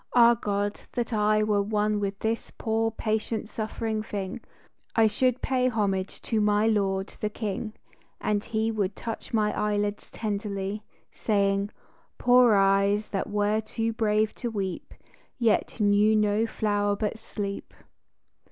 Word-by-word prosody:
Ah 235 -1 +8
God, 205 -2 -2
that 240 -1 -2
I 215 0 +3
Were 210 -1 +2
one 210 0 0
with 200 -1 -2
this 225 +2 -2
poor, 225 0 0
patient, 220 0 -2
suffering 220 0 -3
thing, 200 -3 -5 0.5
I 225 - +5
should 250 +4 +1
pay 255 -1 +2
homage 200 -5 -1
to 220 -2 0
my 210 +1 +3
Lord 195 -3 +1
the 210 - -1
King, 215 0 -4 0.5
And 205 -1 0
He 220 0 -1
would 205 -3 -1
touch 225 -2 -6
my 215 -2 +1
eyelids 205 0 -1
tenderly, 205 -1 -3 0.3
Saying, 200 -1 +1 0.3
" - - -37
Poor 245 -2 +5
eyes 200 +2 +3
that 195 - -2
were 210 +1 +1
too 225 +1 -2
brave 215 -1 +1
to 240 - -1
weep, 195 -5 -4 0.4
Yet 230 -1 +1
knew 210 +1 +4
no 210 +1 +2
flower 205 -2 0
but 215 +1 -2
sleep." 200 -2 -5
210 Hz, 145 wpm, -27 LUFS, 205-220 Hz, 0.5 s, Ah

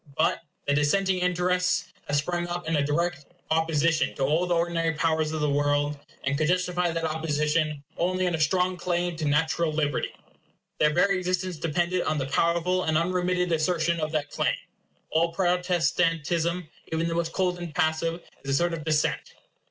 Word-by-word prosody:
But 160 - +2 0.3
the 145 - +2
dissenting 185 +6 +2
interests 180 0 +1
have 145 - 0
sprung 175 +4 -1
up 175 -1 -4
in 165 - 0
direct 170 +1 -1 0.3
opposition 160 0 +2
to 135 - -1
all 155 +6 +2
the 175 - +2
ordinary 165 -1 +1
powers 160 0 +1
of 155 -1 -2
the 150 - +2
world, 145 +1 +1 0.3
and 135 +1 0
could 155 +1 +1
justify 180 0 +1
that 165 0 -2
opposition 155 -1 0
only 185 +2 +1
on 180 - 0
a 160 - -1
strong 180 +4 +2
claim 175 -1 -1
to 160 - -2
natural 160 +2 +1
liberty. 150 -3 0 0.7
Their 150 0 +4
very 185 +4 +3
existence 185 -1 -2
depended 175 +3 0
on 155 - 0
the 135 - -1
powerful 170 +5 +1
and 160 -1 +2
unremitted 180 +1 0
assertion 165 +1 +1
of 155 -1 -2
that 150 -2 -1
claim. - - +1 0.6
All 165 +1 +2
Protestantism, 170 -1 +1 0.2
even 160 +1 0
the 165 - -1
most 165 0 -1
cold 180 -2 0
and 175 -2 -6
passive, 165 0 0 0.2
is 140 - -6
a - - +1
sort 175 +3 +1
of 160 -2 -4
dissent. 155 -1 0
165 Hz, 175 wpm, -26 LUFS, 155-180 Hz, 0.7 s, Their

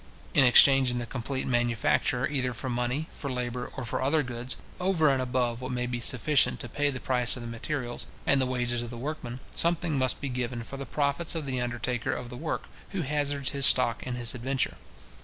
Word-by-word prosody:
In 140 - +5
exchanging 130 0 +6
the 120 - -3
complete 130 +3 -4
manufacture 120 -2 +1
either 130 -3 -1
for 130 +2 -4
money, 125 +6 -1
for 140 - -6
labour, 125 -1 -4
or 130 - -4
for - - -2
other 150 +3 +2
goods, 125 +1 -4 0.2
over 180 -5 +2
and 130 - 0
above 125 -2 -1
what 130 +1 -5
may 125 0 -1
be 125 -1 -3
sufficient 125 +3 +3
to - - -6
pay 145 +3 0
the 130 -2 -4
price 125 -2 +3
of 125 - -7
the - - -6
materials, 120 +1 -4 0.2
and 140 -1 +3
the 130 - +1
wages 125 -1 -1
of 120 - -5
the 120 - -8
workmen, 130 -2 -5
something 170 -1 +1
must 130 -1 +1
be 140 - -4
given 125 -2 -3
for 135 - -8
the 140 - -6
profits 145 +4 0
of 160 -3 -3
the 130 -2 -2
undertaker 120 +1 -2
of 125 - -6
the 125 - -7
work, 155 +5 -3 0.3
who 185 -3 -1
hazards 145 -1 -1
his 140 -1 +8
stock 125 -2 +5
in 125 -1 -4
this 120 -2 +1
adventure. 130 +2 -2
125 Hz, 215 wpm, -28 LUFS, 120-140 Hz, 0.3 s, his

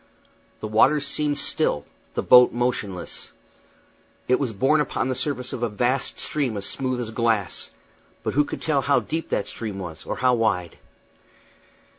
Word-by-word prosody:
The 110 - -3
waters 140 +7 +4
seemed 145 0 0
still, 75 - +1 0.3
the - - -1
boat 125 0 +7
motionless. 120 -7 -2 1.0
It 125 - +3
was 130 -5 -1
borne 135 +9 +2
upon 130 -1 -1
the 130 - -1
surface 130 -1 -2
of - - -5
a 120 - 0
vast 125 +5 -1
stream 135 -8 -1
as 100 - -3
smooth 130 +1 -1
as 115 -2 -4
glass; 110 -5 0 0.5
but - - -2
who 145 - +4
could - - -7
tell 150 -4 +2
how 140 +1 +2
deep 165 +1 -4
that 100 - -1
stream 110 -4 -5
was, 85 -5 -7
or - - -4
how 130 -1 +3
wide? 100 -7 0
125 Hz, 165 wpm, -24 LUFS, 110-140 Hz, 1.0 s, boat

